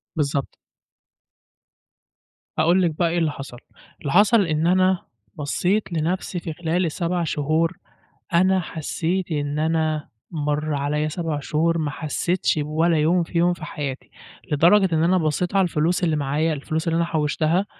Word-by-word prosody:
بالضبط. 140 -2 -1 2.0
هاقول 170 +4 +4
لِك 170 - +2
بقى 170 -1 +2
إيه 175 - -1
اللي 160 -3 +1
حصل، 135 -3 -9 0.4
اللي 140 - -3
حصل 210 +4 +5
إن 155 0 0
أنا 185 0 +3 0.3
بصّيت 180 +6 -1
لنفسي 175 +3 -1
في 165 -2 -5
خلال 175 +2 -1
ال7 170 +2 -1
شهور، 160 +3 0 0.6
أنا 185 +2 +4
حسّيت 170 +2 -3
إن 145 0 -1
أنا 155 -1 0 0.2
مَر 150 -1 -1
عليَّ 150 +2 -1
7 160 -2 -3
شهور 165 +3 0
ما 155 -2 -1
حسّيتش 160 +2 -1
بولا 160 +3 +1
يوم 170 +4 +3
فيهم 170 +1 +1
في 165 -3 -8
حياتي، 140 -3 -5 0.4
لدرجة 175 +4 +4
إن 160 - +2
أنا 180 +2 +3
بصّيت 175 +3 -1
على 195 - +5
الفلوس 170 +1 0
اللي 160 -3 +2
معايا، 150 +3 0
الفلوس 155 +3 -3
اللي 165 - +1
أنا 170 - +2
حوّشتها، 160 +4 0
160 Hz, 150 wpm, -23 LUFS, 150-175 Hz, 2.0 s, حصل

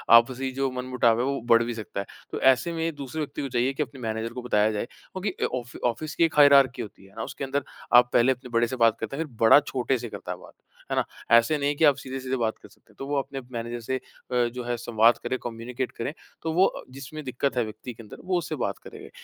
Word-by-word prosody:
आपसी 130 +3 +4
जो 135 +1 -1
मनमुटाव 125 -2 +1
है 125 - +1
वो 140 0 -1
बढ़ 115 -1 +5
भी 120 - -3
सकता 110 -3 -6
है। 100 - -3 0.3
तो - - -3
ऐसे 130 +6 +4
में 165 -1 -2
ही 165 - 0
दूसरे 145 0 -6
व्यक्ति 145 0 -4
को 135 - -3
चाहिए 125 +2 +1
कि 150 - 0
अपने 135 -3 -11
मैनेजर 110 0 -3
को 125 - -5
बताया 110 -3 +2
जाए, 105 +2 -2
क्योंकि 190 - -5
ऑफ़ 125 -1 -4
ऑफ़िस 135 +7 -2
की - - +3
एक 165 - -2
हायरार्की 140 -3 +6
होती 100 -2 -10
है 95 - -19
ना, 115 - -4
उसके 140 - -6
अंदर 135 +1 -1 0.3
आप 120 0 +8
पहले 120 +3 +5
अपने 125 0 -5
बड़े 115 0 +2
से 130 - -4
बात 115 -2 +4
करते 115 +5 -4
हैं 160 - 0
फिर 130 -7 -16
बड़ा 115 +6 +8
छोटे 130 -2 -1
से 120 -1 -6
करता - - -7
है - - -4
बात, - - -15 0.4
है - - +1
ना? - - +3 0.3
ऐसे 120 +7 +3
नहीं 145 0 0
कि 155 - +4
आप 145 -2 +6
सीधे-सीधे 130 0 -4
बात 115 -2 -1
कर - - -13
सकते - - -24
हैं। - - -25
तो 135 - -4
वो 145 0 +1
अपने 135 0 -7
मैनेजर 120 0 -4
से 130 +3 -2
अ, - - -13 0.5
जो 125 -1 -5
है 120 0 -1
संवाद 115 0 +4
करे, 125 +2 -1
कम्यूनिकेट 120 +2 -4
करें, 125 +6 -4 0.3
तो 160 0 -2
वो 185 +3 +4 0.2
जिसमें 140 +4 -8
दिक्कत 130 0 -2
है 120 - +3
व्यक्ति 110 +3 -8
के 115 - -12
अंदर 105 - -11
वो 185 -1 +1
उससे 165 -2 -3
बात 100 - -3
करेगा - - -11
125 Hz, 260 wpm, -26 LUFS, 115-140 Hz, 0.5 s, आप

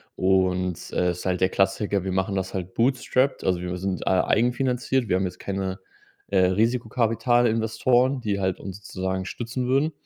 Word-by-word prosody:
Und, 95 -2 +1
äh, 90 - +1
es 90 0 -3
ist - - -8
halt 90 -1 0
der 95 - +4
Klassiker. 95 0 0
Wir 95 - -2
machen 95 +2 -1
das 95 0 -3
halt 95 -1 -5
bootstrapped, 130 +2 +1
also 90 -2 0
wir 90 0 -4
sind, 95 0 -3
äh, - - +1
eigenfinanziert. 125 +5 +1
Wir 90 - +2
haben 95 - 0
jetzt 90 0 -6
keine, 95 -1 -3 0.5
äh, 100 - +1
Risikokapital-Investoren, 120 +3 +2
die 100 -3 -1
halt 95 -1 -1
uns 95 0 -7
sozusagen 95 0 -3
stützen 120 +4 -4
würden. 140 +5 +2
100 Hz, 175 wpm, -24 LUFS, 95-120 Hz, 0.5 s, der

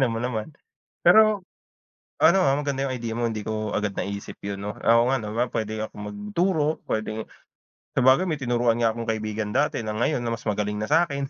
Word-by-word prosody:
alam 130 -3 +3
mo 115 - -3
naman. 115 -1 -3 0.5
Pero 210 +2 +6 0.8
ano 170 +4 +6
ah, 135 - +4
maganda 140 -1 -1
yung 130 - -2
idea 115 -2 -4
mo, 120 - 0
hindi 110 -2 -2
ko 110 0 -3
agad 105 -1 -2
naisip 100 +1 -4
yun, 100 -1 -4
'no? 105 +1 -5
Oo 115 +1 +4
nga 135 - +2
naman, 115 +2 -2
puwede 110 -1 -3
akong 105 -1 -6
magturo, 150 - 0
puwedeng 110 0 -3 0.7
sabagay 130 +9 +4
may 160 -3 -1
tinuruan 120 -3 +1
nga 115 -1 +2
akong 115 +1 -6
kaibigan 110 -1 -2
dati 150 - +1
na 110 -2 -4
ngayon 120 +5 +1
na 120 -1 -2
mas 115 - -14
magaling 105 -1 -1
na 110 +5 -4
sa'kin. 155 -4 +2
115 Hz, 195 wpm, -25 LUFS, 110-135 Hz, 0.8 s, Pero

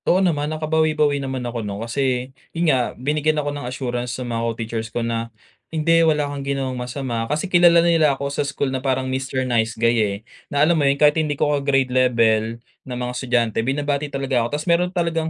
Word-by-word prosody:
Oo 180 - +5
naman 155 -6 +1
nakabawi-bawi 155 -2 +1
naman 130 -2 -4
ako 120 -1 -3
'no, 100 -2 -5
kasi, 130 +1 -1 0.2
yun 165 -3 +3
nga, 125 -2 -1
binigyan 150 +4 0
ako 145 -1 -1
ng 145 -4 -5
assurance 125 -1 -3
sa 130 - -5
mga 115 -1 -2
co-teachers 115 0 -4
ko 115 +1 -3
na, 115 0 -2 0.4
hindi 165 +1 +3
wala 150 -2 +2
kang 145 -1 -5
ginawang 135 -1 -2
masama, 125 -2 -4
kasi 150 +5 -1
kilala 175 -2 +5
nila 160 -5 +3
ako 140 0 -4
sa - - 0
school 140 -1 -2
na 130 - -2
parang 130 -1 0
"Mister 130 0 -2
Nice 115 -2 0
Guy" 115 +1 +2
eh, 100 -2 0 0.3
na 145 +1 +3
alam 170 - +3
mo 140 - +4
yun 140 - +1
kahit 150 0 +5
hindi 150 -2 -2
ko 150 +1 +1
ka-grade 135 -3 +1
level, 115 -3 +2 0.2
na 125 -1 -7
mga 125 0 -3
estudyante 120 -3 0
binabati 145 +3 -1
talaga 135 -3 0
ako, 120 +5 -2
tapos 150 - -6
meron 175 +1 +3
talagang 165 -3 -1
135 Hz, 210 wpm, -21 LUFS, 120-150 Hz, 0.4 s, Oo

